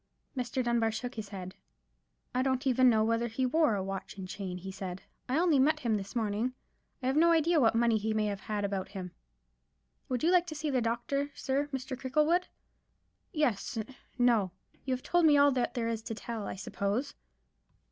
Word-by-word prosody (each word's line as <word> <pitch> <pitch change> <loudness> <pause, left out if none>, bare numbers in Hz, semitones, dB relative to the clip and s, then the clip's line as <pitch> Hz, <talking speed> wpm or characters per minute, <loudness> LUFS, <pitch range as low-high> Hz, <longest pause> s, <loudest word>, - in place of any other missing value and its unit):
Mr. 250 0 -1
Dunbar 235 -2 +2
shook 245 +3 -4
his 215 -3 -6
head. 185 -2 -7 0.8
"I 255 - +1
don't 260 0 0
even 255 -1 +5
know 220 -2 +4
whether 230 +1 +1
he 235 +3 -1
wore 300 -3 +3
a 195 - -2
watch 195 +1 -5
and 190 -1 -6
chain," 185 -1 -5
he 190 +2 -7
said; 190 -1 -6 0.3
"I 260 - +1
only 330 -4 +4
met 295 +4 +3
him 230 -3 +1
this 200 +1 -5
morning. 225 +2 0 0.5
I - - -2
have 260 +1 +1
no 335 +2 +5
idea 330 0 +4
what 230 -4 +4
money 230 -1 +3
he 220 +1 -1
may 215 0 +1
have 200 -2 -2
had 205 +1 -2
about 195 -2 -2
him." 185 -3 -6 1.0
"Would 250 +1 -1
you 335 - +4
like 355 -1 +4
to 310 - -5
see 300 0 -2
the 255 -2 +2
doctor, 240 +5 -1
sir—Mr. 270 -1 -2
Cricklewood?" 300 +7 +1 0.8
"Yes—no—you 240 - -1
have 255 0 -1
told 345 -2 +3
me 295 -1 +6
all 285 0 +6
that 250 -2 -1
there 235 -2 -1
is 230 -1 -2
to 225 - -5
tell, 225 -1 -5
I - - -4
suppose?" 200 +6 -2
240 Hz, 190 wpm, -31 LUFS, 210-270 Hz, 1.0 s, me